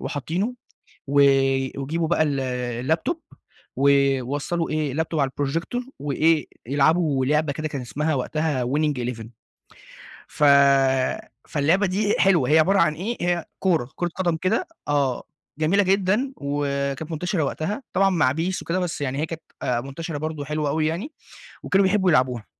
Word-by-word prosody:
وحاطينه، 175 - -3 0.5
و 140 - -5 0.6
ويجيبوا 160 +4 -2
بقى 170 -1 +2
ال 140 -3 0 0.5
الlaptop 165 - +1 0.6
ويوصلوا 140 +4 +1
إيه 155 -3 -1
الlaptop 160 0 -1
على 135 -1 +1
الprojecor، 165 - -3
وإيه 150 +1 +1 0.2
يلعبوا 145 0 +2
لعبة 150 0 +1
كده 155 +2 -4
كان 140 -3 -5
اسمها 150 +6 -2
وقتها 145 0 -1
Winning 145 +1 0
11 115 -2 -4 1.0
ف 150 - -1 1.0
فاللعبة 160 +7 +2
دي 205 +3 0
حلوة 180 -9 +3
هي 155 - +6
عبارة 195 +5 +3
عن 155 -2 +3
إيه؟ 210 +9 -4
هي 175 -1 0
كورة، 165 -10 +1
كورة 175 - -1
قدم 175 -2 -1
كده 195 - 0 0.2
آه 140 -3 0 0.3
جميلة 170 +6 +3
جدًا، 200 +7 +1
وكانت 140 +1 -2
منتشرة 165 +1 -1
وقتها، 160 - -3
طبعًا 195 +1 +3
مع 160 -8 +2
PES 170 +5 -2
وكده 175 +2 -1
بس 175 -3 -3
يعني 135 -1 -2
هي 155 - 0
كانت 165 0 -7 0.2
آآ 120 -1 0
منتشرة 145 +4 -6
برضه 155 -1 -4
حلوة 150 0 -2
أوي 155 +1 0
يعني، 185 - -3 0.5
وكانوا 195 0 +3
بيحبوا 190 -1 +2
يلعبوها. 125 -6 +1
155 Hz, 150 wpm, -23 LUFS, 140-175 Hz, 1.0 s, هي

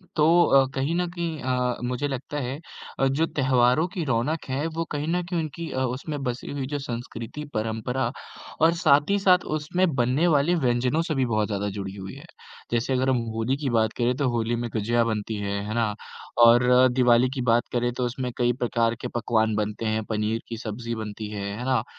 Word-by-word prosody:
तो 150 -2 +4 0.2
अ, 135 -1 +5
कहीं 135 +5 0
न 180 0 0
कहीं 170 -3 -4
अ, 125 -1 0
मुझे 125 +3 -1
लगता 135 +2 -5
है, 130 +1 -4 0.4
अ, 135 - +4
जो 140 +5 +1
त्योहारों 130 +2 +2
की 185 -2 -4
रौनक 135 +6 0
है, 135 +4 -1
वो 165 +1 -3
कहीं 150 0 -2
न 175 +2 +1
कहीं 175 0 -2
उनकी 160 +1 -5
अ, 130 - -2 0.2
उसमे 150 +2 -5
बसी 125 0 -5
हुई 140 -2 -3
जो 145 +1 -3
संस्कृति, 120 +1 -6
परम्परा 115 +3 -1 0.5
और 165 +1 +5
साथ 150 -3 +3
ही 200 0 +3
साथ 185 -2 +4
उसमे 165 +5 0 0.2
बनने 130 +8 +2
वाली 155 +2 +3
व्यंजनों 125 0 +1
से 155 - -1
भी 135 -1 +2
बहुत 110 -3 0
ज़्यादा 105 -1 -2
जुड़ी 95 -1 -5
हुई 95 +3 -8
है। 140 +4 -12 0.5
जैसे 120 +3 0
अगर 130 +1 +1
हम 130 - +3 0.2
होली 115 +4 0
की 140 -2 -2
बात 110 -2 +2
करें, 125 +1 +1
तो 140 -3 +1
होली 120 0 0
में 120 0 -3
गुजिया 115 +2 +1
बनती 110 -1 -2
है, 100 0 -2
है 110 - -3
ना, 115 -3 +1 0.5
और 120 +1 +6
अ, 125 +1 +6
दिवाली 125 0 +4
की 135 - -3
बात 120 -1 +2
करे 120 0 +1
तो 125 - 0
उसमें 125 +1 -3
कई 120 -1 +2
प्रकार 115 -2 0
के - - -3
पकवान 110 -1 +1
बनते 105 +1 -2
हैं, 110 0 0
पनीर 110 +1 -1
की 115 - -5
सब्ज़ी 115 +1 -5
बनती 110 -1 -6
है, - - -6 0.2
है 120 - -5
ना? 130 -4 +1
125 Hz, 215 wpm, -25 LUFS, 115-145 Hz, 0.5 s, और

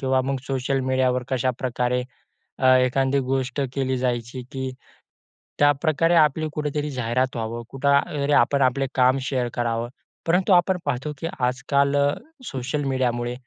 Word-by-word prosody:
किंवा 130 -1 +2
मग 135 - 0
सोशल 135 0 -1
मीडियावर 130 -1 +2
कशाप्रकारे, 125 -1 -1 0.9
एखादी 135 +2 +1
गोष्ट 135 +1 -1
केली 130 -1 0
जायची 125 0 -2
की 130 -1 -4 0.9
त्याप्रकारे 155 +3 +3
आपली 155 0 +3
कुठेतरी 150 0 -2
जाहिरात 125 +1 -1
व्हावी, 115 +1 -3
कुठे 135 +1 -3 0.4
तरी, 145 - 0
आपण 140 +3 +3
आपले 135 +1 -2
काम 130 +1 +4
शेअर 130 -2 -1
करावं. 120 0 -1 0.4
परंतु 185 +3 +3
आपण 180 +1 +4
पाहतो 140 +2 -2
की 165 - -4 0.2
आजकाल 140 +2 +1
अ, 140 0 +3 0.3
सोशल 135 +3 -3
मीडियामुळे 120 -2 -1
130 Hz, 135 wpm, -23 LUFS, 125-140 Hz, 0.9 s, काम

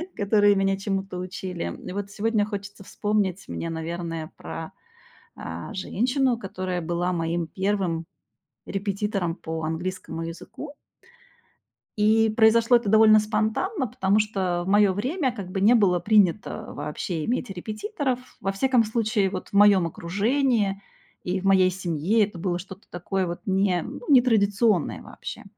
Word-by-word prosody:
которые 205 0 +4
меня 195 0 +1
чему-то 195 -1 -3
учили. 180 -1 -5
И - - -5
вот 200 0 -4
сегодня 215 0 +1
хочется 205 -1 -7
вспомнить 200 -2 -1
мне, 165 - -4
наверное, 165 0 -4
про, 160 - -7 0.6
а, - - -7
женщину, 250 +6 0
которая 185 -4 -4
была 175 +2 -1
моим 165 0 -1
первым 190 -3 -1 0.6
репетитором 195 -3 -2
по 160 -2 -5
английскому 165 +1 -4
языку. 170 - -8 1.2
И 220 +1 +4
произошло 230 +2 +5
это 235 -3 -1
довольно 215 +1 +7
спонтанно, 220 - 0
потому 200 -2 +1
что 190 -5 -1
в - - -6
моё 205 0 +5
время 260 - -1
как 200 -6 -7
бы 190 - -2
не 215 +5 +6
было 195 -6 +4
принято 205 -1 +1
вообще 150 +2 -4
иметь 245 +2 -2
репетиторов. 250 - -3 0.2
Во 195 - -1
всяком 250 +3 +2
случае, 215 -2 0
вот, 185 -1 -6
в - - -24
моём 200 -3 +6
окружении 205 - 0 0.4
и 185 +1 -1
в - - -11
моей 190 -1 +5
семье 185 +3 +1
это 200 -3 -8
было 175 0 -1
что-то 190 +2 -11
такое 185 +2 -2
вот 170 0 -5
не 190 -2 +1
ну, - - -7
не 260 -3 +7
традиционное 205 -5 +2
вообще. - - -9
195 Hz, 145 wpm, -25 LUFS, 180-215 Hz, 1.2 s, довольно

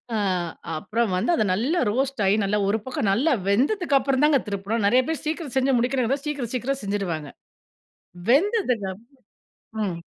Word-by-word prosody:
ஆ - - +1 0.6
அப்புறம் 225 +5 -1
வந்து 185 - -1
அத 310 - +2
நல்லா 265 - 0
ரோஸ்ட்டாகி 225 -5 +1 0.3
ஒரு 210 - +2
பக்கம் 255 -5 -1
நல்லா 260 +11 +2 0.2
வெந்ததுக்கப்புறம் 275 - +2
தாங்க 300 -2 +5
திருப்பணும். 200 +2 -2
நெறைய 250 +5 +5
பேர் 320 - -3
சீக்கிரம் 310 -3 -3
செஞ்சு 265 -1 +3
முடிக்கணு 255 +2 0
சீக்கிரம், 280 -6 -3
சீக்கிரம் 265 +3 -2
செஞ்சுருவாங்க. 185 -7 -3 1.0
வெந்ததுக்கப்பற 260 - +2 0.9
ம். 180 -4 -2
250 Hz, 130 wpm, -24 LUFS, 205-280 Hz, 1.0 s, தாங்க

